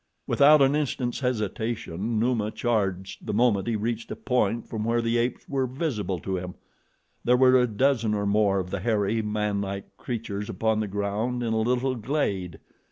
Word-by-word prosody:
Without 145 Hz, 0 st, +6 dB
an 135 Hz, +2 st, +3 dB
instant's 130 Hz, -4 st, -1 dB
hesitation, 110 Hz, -3 st, -2 dB
Numa 115 Hz, -2 st, +1 dB
charged 100 Hz, -5 st, -2 dB
the -, -, -1 dB
moment 110 Hz, -4 st, +2 dB
he 115 Hz, -, 0 dB
reached 115 Hz, +2 st, -3 dB
a -, -, -4 dB
point 115 Hz, -3 st, 0 dB
from 110 Hz, -2 st, -4 dB
where 115 Hz, +1 st, +1 dB
the 115 Hz, 0 st, +1 dB
apes 120 Hz, +1 st, -2 dB
were 135 Hz, -2 st, 0 dB
visible 125 Hz, -, -2 dB
to 95 Hz, -1 st, -2 dB
him. 90 Hz, 0 st, -6 dB, 0.7 s
There 125 Hz, +1 st, +4 dB
were 130 Hz, 0 st, +6 dB
a 125 Hz, -, +2 dB
dozen 115 Hz, -1 st, +1 dB
or 100 Hz, 0 st, -1 dB
more 100 Hz, -1 st, +2 dB
of 90 Hz, -1 st, -3 dB
the 100 Hz, -, -2 dB
hairy, 105 Hz, +1 st, +1 dB
manlike 100 Hz, -2 st, -3 dB
creatures 105 Hz, -4 st, -4 dB
upon 110 Hz, -1 st, 0 dB
the 110 Hz, -, -1 dB
ground 105 Hz, +5 st, -2 dB
in 115 Hz, -1 st, 0 dB
a 110 Hz, -, +1 dB
little 125 Hz, +3 st, +1 dB
glade. 105 Hz, -, -2 dB
110 Hz, 175 wpm, -26 LUFS, 100-125 Hz, 0.7 s, Without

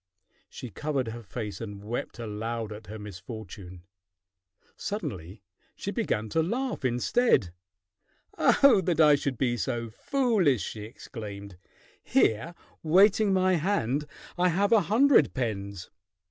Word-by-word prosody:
She 125 Hz, -, -8 dB
covered 140 Hz, -, -2 dB
her 120 Hz, +1 st, -7 dB
face 105 Hz, 0 st, -6 dB
and 105 Hz, -3 st, -7 dB
wept 115 Hz, +4 st, -4 dB
aloud 115 Hz, 0 st, -4 dB
at 105 Hz, +1 st, -11 dB
her 110 Hz, +2 st, -7 dB
misfortune. 100 Hz, -3 st, -9 dB, 0.9 s
Suddenly 100 Hz, -, -5 dB, 0.3 s
she -, -, -4 dB
began 110 Hz, +1 st, -1 dB
to 160 Hz, -, +1 dB
laugh 245 Hz, -, -2 dB
instead. 125 Hz, -, +2 dB, 0.8 s
"Oh, 275 Hz, -8 st, +5 dB
that 170 Hz, -3 st, 0 dB
I 150 Hz, -2 st, +7 dB
should 140 Hz, -3 st, -1 dB
be 120 Hz, -1 st, 0 dB
so 115 Hz, +3 st, -3 dB
foolish!" 200 Hz, -, +1 dB
she 105 Hz, +2 st, -6 dB
exclaimed. 100 Hz, -3 st, -9 dB, 0.5 s
"Here 135 Hz, +11 st, +1 dB, 0.3 s
waiting 195 Hz, +5 st, +4 dB
my 185 Hz, -1 st, +3 dB
hand 150 Hz, -, 0 dB, 0.3 s
I 180 Hz, 0 st, +4 dB
have 200 Hz, +5 st, +1 dB
a 225 Hz, -2 st, +6 dB
hundred 235 Hz, -, +4 dB
pens." 100 Hz, -7 st, -4 dB
120 Hz, 125 wpm, -28 LUFS, -, 0.9 s, I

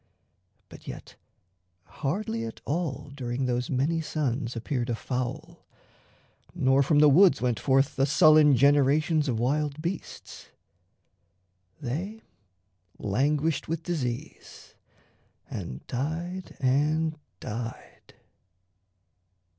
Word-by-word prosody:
But -, -, -14 dB
yet -, -, -9 dB, 0.7 s
Hardly 140 Hz, -, -3 dB
at 115 Hz, -1 st, -7 dB
all 145 Hz, -3 st, -3 dB
during 130 Hz, -1 st, -3 dB
those 125 Hz, 0 st, -1 dB
many 145 Hz, +5 st, 0 dB
suns 135 Hz, -6 st, -2 dB
Appeared 120 Hz, +1 st, -2 dB
a 120 Hz, -, 0 dB
fowl, 135 Hz, +8 st, -5 dB, 0.9 s
nor 135 Hz, +1 st, +3 dB
from 145 Hz, +2 st, +2 dB
the 150 Hz, 0 st, +7 dB
woods 160 Hz, 0 st, +6 dB
went 120 Hz, -3 st, 0 dB
forth 135 Hz, +1 st, +2 dB
The 135 Hz, +1 st, +3 dB
sullen 155 Hz, -1 st, +6 dB
generations 145 Hz, +3 st, +3 dB
of 120 Hz, -, 0 dB
wild 145 Hz, +4 st, 0 dB
beasts 170 Hz, +4 st, -6 dB, 1.3 s
They 175 Hz, -, -5 dB, 0.7 s
languished 145 Hz, +9 st, 0 dB
with 165 Hz, 0 st, -3 dB
disease 130 Hz, -9 st, -5 dB, 0.8 s
and 65 Hz, -, -6 dB
died 170 Hz, +8 st, -4 dB
and 155 Hz, +4 st, +1 dB, 0.2 s
died. 115 Hz, +2 st, -7 dB
140 Hz, 100 wpm, -27 LUFS, 125-155 Hz, 1.3 s, the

